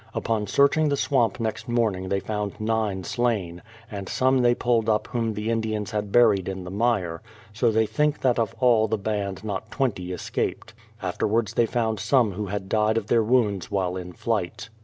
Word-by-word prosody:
Upon 110 -3 -1
searching 145 +6 +3
the 140 - 0
swamp 130 -4 +1
next 115 +2 -3
morning 105 -6 0
they 100 - +1
found 105 -1 -4
nine 110 -3 -1
slain, 100 -6 -1 0.3
and 100 -2 -6
some 130 0 +2
they 120 -1 +4
pulled 115 -2 +1
up 105 -1 +2
whom 115 -3 -2
the 105 +2 -2
Indians 110 -2 -2
had 105 -1 -3
buried 105 -6 +4
in 95 -1 -5
the 90 - -7
mire; 100 -6 0 0.3
so 115 +3 +2
they 110 0 +2
think 150 +8 0
that 125 -2 +2
of 115 -3 -1
all 115 -4 +4
the 110 +1 0
band 100 -2 -3
not 100 -3 -4
twenty 100 -10 -2
escaped. 90 - -3 0.3
After 90 +2 -1
wards 110 0 0
they 115 0 +2
found 110 -2 -1
some 120 0 +3
who 100 +2 -4
had 95 0 -4
died 110 +2 +2
of 115 - -1
their 115 +2 +3
wounds 105 -5 +1
while 95 -2 -1
in 90 -1 -6
flight. 110 +1 -3
110 Hz, 195 wpm, -25 LUFS, 100-120 Hz, 0.3 s, they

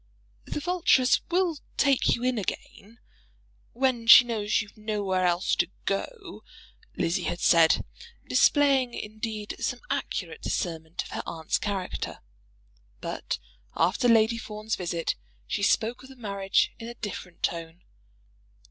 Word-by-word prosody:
"The - - -4
Vulturess 320 -6 +3
will 350 -3 +1 0.2
take 275 -3 +3
you 235 - -7
in 250 -2 +1
again, 205 +2 -6 0.8
when 245 -2 0
she 240 +1 +11
knows 215 -3 0
you've 205 -2 -6
nowhere 205 -4 0
else 175 +2 +1
to 175 - +1 0.2
go," 370 - -4 0.5
Lizzie 165 - 0
had 175 - -2
said, 165 -3 +5 0.4
displaying, 275 -4 +3
indeed, 215 0 -5
some - - -2
accurate 455 - -3
discernment 165 -2 -3
of - - -12
her - - -4
aunt's 160 -1 -2
character. 195 -3 -4 0.8
But - - -4 0.4
after 185 +9 +2
Lady 230 0 +4
Fawn's 215 0 -4
visit 170 -2 -2 0.3
she - - -2
spoke 225 +4 +1
of 260 - -13
the 265 - -12
marriage 200 -5 0
in 230 - -7
a 240 - -7
different 185 -6 -7
tone. 165 0 -3
215 Hz, 130 wpm, -27 LUFS, 185-250 Hz, 0.8 s, she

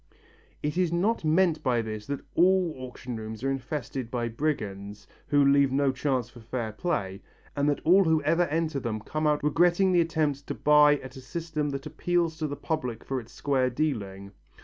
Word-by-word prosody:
It 150 +4 -1
is 180 -3 +2
not 190 +6 +1
meant 160 +1 +2
by 120 -2 +1
this 110 -1 -6
that 140 0 -3
all 180 -1 +3
auction 125 -2 -7
rooms 110 +1 -7
are 135 - +1
infested 135 -2 -4
by 120 -1 -2
brigands, 105 -7 -3 0.2
who 145 -1 +4
leave 140 -1 +4
no 140 0 +2
chance 130 -2 -1
for 120 0 -15
fair 115 0 -4
play, 100 - -3 0.3
and 145 0 +2
that 145 - -1
all 185 +4 +5
who 160 -1 +3
ever 175 +1 +3
enter 155 -1 -1
them 115 -4 -3
come 155 +7 -2
out 150 -1 +1
regretting 175 +5 +3
the 175 -1 +4
attempt 155 -4 -1
to - - -3
buy 150 0 +5
by 145 - -8
a 130 - -8
system 150 +3 -4
that 140 -1 -5
appeals 165 +1 -1
to 155 - -1
the 145 - -4
public 130 -7 -3
for 135 -1 -2
its 115 - -12
square 130 -3 0
dealing. 100 -9 -3
140 Hz, 195 wpm, -27 LUFS, 120-160 Hz, 0.3 s, all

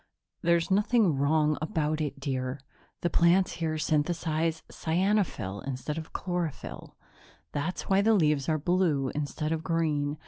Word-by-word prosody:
"There's 170 +2 +2
nothing 205 - +3
wrong 150 +2 +2
about 155 0 -1
it, 145 -2 -3
dear. 130 -1 -3 0.4
The 175 - +1
plants 180 +2 +4
here 160 -1 0
synthesize 160 +1 0
cyanophyll 165 - 0
instead 140 +4 -3
of 160 - -9
chlorophyll; 175 -4 -4 0.6
that's 155 +5 -2
why 195 0 +3
the 220 +2 +4
leaves 150 -5 +2
are 155 - +2
blue 155 -5 +1
instead 150 +1 -3
of 160 -1 -1
green. 155 -3 0
155 Hz, 135 wpm, -28 LUFS, 145-175 Hz, 0.6 s, plants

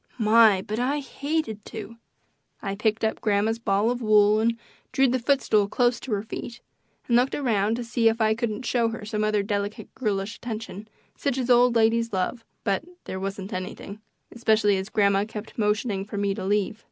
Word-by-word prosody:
My, 215 -3 +5
but 215 +3 -4
I 265 +4 +1
hated 280 -6 -3
to! 225 +1 -8 0.6
I 195 -2 -4
picked 215 +2 -1
up 220 - 0
grandma's 215 +2 +1
ball 205 +1 +1
of 245 0 -3
wool 210 -1 +5
and 230 +1 +1 0.3
drew 270 0 +3
the 255 +1 +1
footstool 235 -5 +2
close 240 +3 +1
to 260 - -8
her 200 0 -1
feet, 235 +2 -7 0.5
and 235 - +2
looked 250 +2 +3
around 220 -6 +1
to 245 - -4
see 230 -1 +2
if 225 +1 -2
I 220 -1 +3
couldn't 230 +1 -3
show 235 -1 +2
her 225 -2 -6
some 215 0 -2
other 210 -1 +1
delicate 205 0 -3
girlish 205 -3 -2
attention 215 -3 -6 0.3
such 275 -3 -1
as 255 -1 0
old 245 0 +5
ladies 230 0 +2
love, 190 +5 -2 0.2
but 200 +5 0 0.2
there 190 - -5
wasn't 195 0 -5
anything, 190 +3 -6 0.3
especially 220 -3 +2
as 190 +2 -4
grandma 200 -2 +3
kept 215 0 -8
motioning 210 -1 0
for 205 0 -7
me 200 -1 0
to - - -6
leave. 205 +2 0
220 Hz, 190 wpm, -25 LUFS, 205-235 Hz, 0.6 s, My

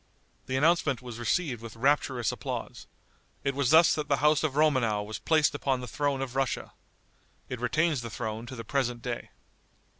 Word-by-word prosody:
The 130 0 -1
announcement 150 -4 +2
was 120 -2 -7
received 120 0 0
with 115 -1 -9
rapturous 130 -1 +1
applause. - - -6 0.6
It 140 - 0
was 135 -2 0
thus 160 +3 +7
that 150 -1 -2
the 140 - +2
house 150 0 +3
of 150 -4 -1
Romanow 130 -9 +2
was 110 +1 -6
placed 155 -2 +3
upon 135 -2 0
the 125 - -6
throne 140 +1 -1
of 130 -1 -7
Russia. 135 -1 -1 0.8
It 125 - -4
retains 155 +2 +1
the 115 - -6
throne 110 0 -5
to 130 - -7
the 115 - -6
present 120 -1 -1
day. 120 -2 -4
130 Hz, 180 wpm, -28 LUFS, 120-145 Hz, 0.8 s, thus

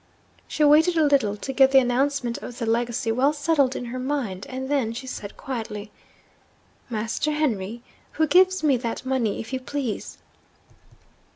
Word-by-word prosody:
She 305 - -1
waited 315 +4 +5
a 320 - +4
little 265 -8 +2
to 270 +6 -5
get 265 0 +6
the 270 - +5
announcement 255 -1 +1
of 245 - -9
the 235 - -3
legacy 235 +1 0
well 265 +6 +2
settled 290 -3 +1
in 245 - -4
her 245 +2 -5
mind 255 -8 -3
and 260 0 -5
then 265 -6 0
she 250 +3 -7
said 210 -5 -7
quietly, 220 -5 -6 1.0
'Master 230 +6 -1
Henry, 235 -7 -2 0.3
who 315 - +2
gives 370 +3 +4
me 280 -4 +4
that 235 +1 -4
money, 255 -5 0
if 225 - -7
you 260 - -1
please?' 255 -4 -4
260 Hz, 165 wpm, -24 LUFS, 230-285 Hz, 1.0 s, get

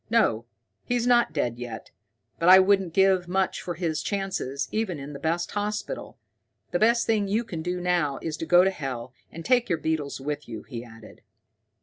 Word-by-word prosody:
"No, 120 - +2 0.4
he's 245 -1 0
not 240 -5 +4
dead 120 -6 -2
yet, 120 -2 -7 0.5
but 170 - +4
I 185 - +11
wouldn't 190 -2 +3
give 190 0 +3
much 190 +1 0
for 175 - -5
his 165 -2 -2
chances, 190 -9 -2
even 215 -6 -1
in 140 +1 -8
the 140 - -7
best 165 +3 -1
hospital. 210 - -4 0.5
The 175 - 0
best 235 +2 +3
thing 215 -3 +1
you 215 +4 +1
can 175 -8 -6
do 180 +2 -2
now 175 -6 0
is 160 -2 -4
to 165 - -5
go 175 0 +6
to 190 - +2
hell, 130 -7 -6 0.2
and 165 0 -9
take 245 -2 +3
your 170 - +2
beetles 155 -3 -2
with 145 +1 -5
you," 110 -2 -6
he 120 -3 -7
added. 115 -2 -14
175 Hz, 195 wpm, -26 LUFS, 145-200 Hz, 0.5 s, I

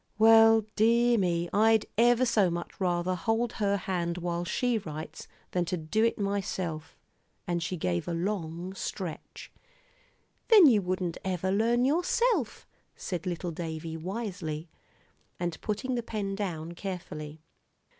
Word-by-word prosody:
"Well, 225 0 +7
dear 235 +2 +4
me, 175 -2 0
I'd 220 +1 +4
ever 240 +2 +4
so 215 -6 +3
much 170 +3 -6
rather 175 0 +1
hold 225 +6 0
her 200 0 +2
hand 175 -2 -2
while 175 0 -2
she 240 +6 0
writes, 155 -4 -8 0.2
than 180 - +1
to 180 +2 -2
do 165 +8 0
it 230 - +2
myself." 190 -5 -3 0.5
And 175 -1 -1
she 180 +2 -3
gave 90 - -1
a - - -2
long 175 -1 -3
stretch. 185 -3 -6 1.0
"Then 425 -7 +8
you 230 -8 +6
wouldn't 180 -2 -2
ever 190 0 -1
learn 235 +5 +2
yourself," 350 - +1 0.3
said 180 -1 -5
little 175 0 -3
Davie, 160 -1 -5
wisely, 175 -4 -5 0.7
and 175 -2 -3
putting 240 +5 -2
the 240 - 0
pen 210 -4 -4
down 170 -5 -4
carefully. 160 -4 -7
185 Hz, 135 wpm, -29 LUFS, 170-225 Hz, 1.0 s, Then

